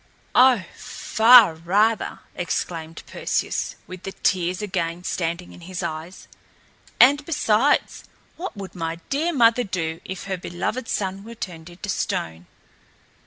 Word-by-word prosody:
"Oh, 250 Hz, -5 st, +6 dB
far 225 Hz, -4 st, +5 dB
rather!" 200 Hz, +8 st, +1 dB
exclaimed 165 Hz, -2 st, -4 dB
Perseus, -, -, -2 dB
with 185 Hz, -1 st, -10 dB
the 195 Hz, +1 st, -6 dB
tears 180 Hz, -1 st, 0 dB
again 175 Hz, -3 st, -2 dB
standing 175 Hz, -1 st, -3 dB
in -, -, -14 dB
his 180 Hz, +1 st, -6 dB
eyes. 160 Hz, +4 st, -6 dB, 0.7 s
"And, 285 Hz, +4 st, +6 dB
besides, 275 Hz, -3 st, +1 dB, 0.3 s
what 350 Hz, -, -6 dB
would 195 Hz, -3 st, -7 dB
my 165 Hz, -2 st, -3 dB, 0.2 s
dear 310 Hz, +5 st, +1 dB
mother 240 Hz, -4 st, +4 dB
do 165 Hz, -5 st, -3 dB
if 190 Hz, -1 st, -6 dB
her 190 Hz, -1 st, -3 dB
beloved 175 Hz, +8 st, -4 dB
son 195 Hz, 0 st, -2 dB
were 230 Hz, +2 st, -10 dB
turned 170 Hz, -5 st, -7 dB
into 175 Hz, 0 st, -9 dB
a -, -, 0 dB
stone?" 80 Hz, +1 st, -3 dB
185 Hz, 135 wpm, -23 LUFS, 170-230 Hz, 0.7 s, Oh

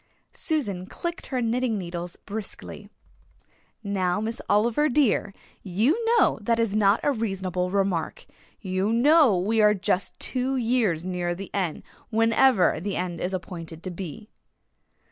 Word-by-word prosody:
Susan 205 Hz, -, -2 dB
clicked 345 Hz, -, -5 dB
her 255 Hz, -2 st, -2 dB
knitting 235 Hz, 0 st, 0 dB
needles 175 Hz, -1 st, -5 dB
briskly. 210 Hz, 0 st, -7 dB, 0.9 s
"Now, 190 Hz, -2 st, 0 dB
Miss 225 Hz, +2 st, -4 dB
Oliver, 235 Hz, +9 st, +3 dB
dear, 245 Hz, -7 st, +2 dB, 0.3 s
you 225 Hz, -, +1 dB
know 425 Hz, -, +3 dB
that 230 Hz, +2 st, +1 dB
is 225 Hz, -3 st, 0 dB
not 205 Hz, 0 st, +4 dB
a 290 Hz, -, +3 dB
reasonable 190 Hz, -6 st, -2 dB
remark. 190 Hz, -4 st, -1 dB, 0.4 s
You 190 Hz, +1 st, -1 dB
know 265 Hz, -, +5 dB
we 215 Hz, +5 st, +1 dB
are 210 Hz, 0 st, +5 dB
just 190 Hz, 0 st, -1 dB
two 260 Hz, +1 st, -1 dB
years 225 Hz, -9 st, +1 dB
nearer 175 Hz, -1 st, -2 dB
the 195 Hz, +2 st, -9 dB
end, 185 Hz, -6 st, -2 dB, 0.3 s
whenever 225 Hz, -4 st, +3 dB
the 195 Hz, +3 st, -3 dB
end 180 Hz, -2 st, -3 dB
is 180 Hz, -, -1 dB
appointed 170 Hz, -3 st, -7 dB
to 185 Hz, -, -4 dB
be." 190 Hz, +4 st, -7 dB
205 Hz, 140 wpm, -25 LUFS, 180-235 Hz, 0.9 s, know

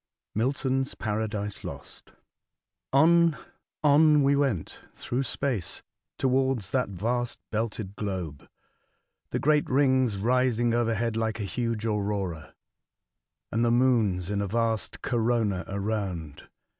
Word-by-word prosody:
Milton's 135 Hz, +3 st, 0 dB
Paradise 105 Hz, -1 st, -3 dB
Lost. -, -, -10 dB, 0.8 s
ON, 165 Hz, +3 st, +5 dB, 0.5 s
on 150 Hz, 0 st, +6 dB
we 140 Hz, +1 st, +4 dB
went 135 Hz, -, -1 dB, 0.2 s
through 125 Hz, +2 st, -2 dB
space 130 Hz, -9 st, -3 dB, 0.3 s
towards 130 Hz, -5 st, +1 dB
that 130 Hz, -4 st, +1 dB
vast 120 Hz, +6 st, -2 dB
belted 110 Hz, -3 st, -3 dB
globe, 90 Hz, -9 st, -5 dB, 0.8 s
the -, -, -1 dB
great 150 Hz, 0 st, +2 dB
rings 130 Hz, -5 st, +3 dB
rising 120 Hz, +1 st, +2 dB
overhead 115 Hz, -1 st, 0 dB
like 115 Hz, 0 st, -1 dB
a -, -, -2 dB
huge 115 Hz, +1 st, -2 dB
aurora, 100 Hz, -6 st, -2 dB, 1.0 s
and 115 Hz, +2 st, +1 dB
the 120 Hz, -, +3 dB
moons 115 Hz, -7 st, +2 dB
in 100 Hz, 0 st, 0 dB
a 100 Hz, -, -1 dB
vast 115 Hz, +1 st, -1 dB
corona 115 Hz, -5 st, 0 dB
around. 95 Hz, -7 st, -4 dB
115 Hz, 110 wpm, -27 LUFS, 100-130 Hz, 1.0 s, on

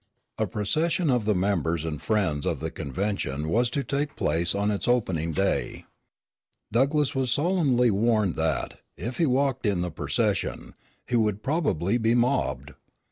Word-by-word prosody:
A -, -, +1 dB
procession 155 Hz, -, 0 dB
of 120 Hz, -4 st, +1 dB
the 105 Hz, -1 st, +2 dB
members 85 Hz, -4 st, 0 dB
and 75 Hz, -2 st, -4 dB
friends 95 Hz, -10 st, 0 dB
of -, -, -1 dB
the 80 Hz, 0 st, -4 dB
convention 80 Hz, -2 st, -3 dB
was 120 Hz, +7 st, +2 dB
to 140 Hz, +3 st, -2 dB
take 140 Hz, +1 st, -2 dB
place 85 Hz, +4 st, 0 dB
on 100 Hz, +1 st, +1 dB
its 100 Hz, -, -3 dB
opening 95 Hz, -10 st, +1 dB
day. 95 Hz, +4 st, -1 dB, 0.9 s
Douglass 140 Hz, +5 st, +2 dB
was 130 Hz, -2 st, 0 dB
solemnly 140 Hz, -6 st, +2 dB
warned 105 Hz, -2 st, +2 dB
that, 80 Hz, -4 st, -2 dB, 0.2 s
if 120 Hz, +2 st, -5 dB
he 165 Hz, -, +3 dB
walked 135 Hz, -2 st, +1 dB
in 95 Hz, -4 st, +1 dB
the 90 Hz, -1 st, -2 dB
procession, 75 Hz, -, -1 dB, 0.3 s
he 125 Hz, -, -2 dB
would 105 Hz, -3 st, +1 dB
probably 125 Hz, -, 0 dB
be 115 Hz, +1 st, +2 dB
mobbed. 120 Hz, -, 0 dB
105 Hz, 155 wpm, -26 LUFS, 85-130 Hz, 0.9 s, he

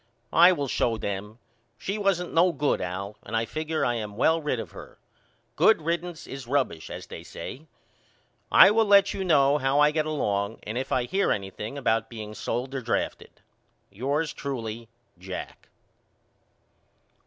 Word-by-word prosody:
I 175 Hz, +2 st, +8 dB
will 145 Hz, -6 st, -1 dB
show 115 Hz, -2 st, 0 dB
them. 100 Hz, +1 st, -5 dB, 0.4 s
She 200 Hz, +3 st, -3 dB
wasn't 190 Hz, -3 st, 0 dB
no 175 Hz, +2 st, +5 dB
good 145 Hz, -2 st, 0 dB
Al 100 Hz, +3 st, -5 dB
and 115 Hz, -, -3 dB
I 115 Hz, -, 0 dB
figure 155 Hz, +6 st, -2 dB
I 120 Hz, -, +1 dB
am 105 Hz, -3 st, -5 dB
well 160 Hz, +6 st, +3 dB
rid 145 Hz, -5 st, -1 dB
of -, -, -7 dB
her. -, -, -12 dB, 0.6 s
Good 220 Hz, -8 st, +4 dB
riddance 170 Hz, 0 st, -3 dB
is 135 Hz, -2 st, -8 dB
rubbish 130 Hz, -, -1 dB
as -, -, -7 dB
they -, -, -9 dB
say. 155 Hz, +5 st, -9 dB, 0.8 s
I -, -, +9 dB
will 225 Hz, +1 st, +3 dB
let 200 Hz, -1 st, +6 dB
you 195 Hz, -, -3 dB
know 145 Hz, -4 st, +4 dB
how 135 Hz, +1 st, +2 dB
I 150 Hz, 0 st, +5 dB
get 155 Hz, 0 st, 0 dB
along 105 Hz, -8 st, -1 dB
and 110 Hz, -, -5 dB
if 130 Hz, +2 st, -3 dB
I 125 Hz, -, +2 dB
hear 190 Hz, +11 st, 0 dB
anything 105 Hz, +6 st, -4 dB
about 115 Hz, -4 st, 0 dB
being 110 Hz, -2 st, -7 dB
sold 125 Hz, +4 st, -3 dB
or 135 Hz, -, -3 dB
drafted. 115 Hz, -, -3 dB, 0.5 s
Yours 140 Hz, +9 st, -1 dB
truly, 115 Hz, -4 st, -5 dB, 0.3 s
JACK. 95 Hz, 0 st, -8 dB
135 Hz, 165 wpm, -26 LUFS, 110-160 Hz, 0.8 s, I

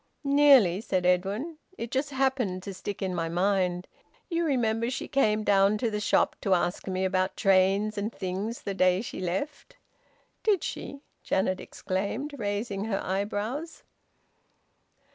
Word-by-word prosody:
"Nearly!" 275 Hz, -10 st, +5 dB
said 185 Hz, -5 st, -1 dB
Edwin. 200 Hz, -, 0 dB, 0.2 s
"It 230 Hz, +1 st, -5 dB
just 270 Hz, +2 st, 0 dB
happened 260 Hz, -9 st, 0 dB
to 195 Hz, -, -6 dB
stick 200 Hz, +2 st, -5 dB
in 185 Hz, -1 st, -1 dB
my 165 Hz, -2 st, -2 dB
mind. 180 Hz, 0 st, 0 dB, 0.4 s
You 335 Hz, 0 st, +1 dB
remember 230 Hz, -5 st, +1 dB
she 255 Hz, -, -4 dB
came 215 Hz, -6 st, +2 dB
down 200 Hz, 0 st, +4 dB
to 230 Hz, 0 st, -1 dB
the 210 Hz, -, -2 dB
shop 210 Hz, -, +2 dB
to 195 Hz, -2 st, +3 dB
ask 175 Hz, +2 st, -1 dB
me 190 Hz, 0 st, -1 dB
about 185 Hz, 0 st, 0 dB
trains 195 Hz, +2 st, +3 dB
and 210 Hz, +3 st, -2 dB
things 195 Hz, +5 st, -4 dB
the 200 Hz, -, -3 dB
day 185 Hz, 0 st, +3 dB
she -, -, -6 dB
left." 190 Hz, -, -4 dB, 0.6 s
"Did 405 Hz, -6 st, +2 dB
she?" 280 Hz, -, -5 dB, 0.2 s
Janet 185 Hz, -1 st, 0 dB
exclaimed, 205 Hz, +10 st, -3 dB
raising 205 Hz, -1 st, -2 dB
her 205 Hz, -3 st, -1 dB
eyebrows. 215 Hz, -, -3 dB
205 Hz, 145 wpm, -28 LUFS, 185-245 Hz, 0.6 s, Nearly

